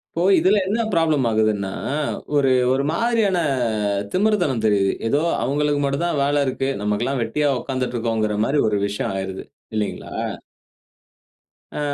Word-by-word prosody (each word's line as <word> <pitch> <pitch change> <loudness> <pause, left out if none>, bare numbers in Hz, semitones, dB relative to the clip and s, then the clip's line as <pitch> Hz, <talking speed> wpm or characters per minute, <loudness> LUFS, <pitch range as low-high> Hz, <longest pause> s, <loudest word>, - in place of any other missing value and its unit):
இப்போ 165 - -1 0.2
இதில 200 +3 +4
என்ன 220 +4 0
ப்ராப்ளம் 155 -6 +2
ஆகுதுன்னா, 110 -3 +1 0.6
ஒரு 135 -2 +3 0.2
ஒரு 135 +1 0
மாரியான 220 -1 +1 0.7
திமிர்த்தனம் 185 - +1
தெரியுது. 100 -2 +2
ஏதோ 140 +6 +2 0.2
அவுங்களுக்கு 145 +2 0
மட்டும் 140 +4 0
தான் 170 -4 0
வேல 145 0 +2
இருக்கு. 135 +1 -1
நமக்கெல்லாம் 120 +6 -1
வெட்டியா 145 +6 0
உட்கார்ந்துட்டுருக்கோங்குறமாரி 115 -1 -1
ஒரு 105 -1 0
விஷயம் 100 -1 -3
ஆயிருது. 95 0 -5 0.3
இல்லீங்களா! 105 -1 -3 1.6
ஆ, - - -3
135 Hz, 120 wpm, -21 LUFS, 110-150 Hz, 1.6 s, இதில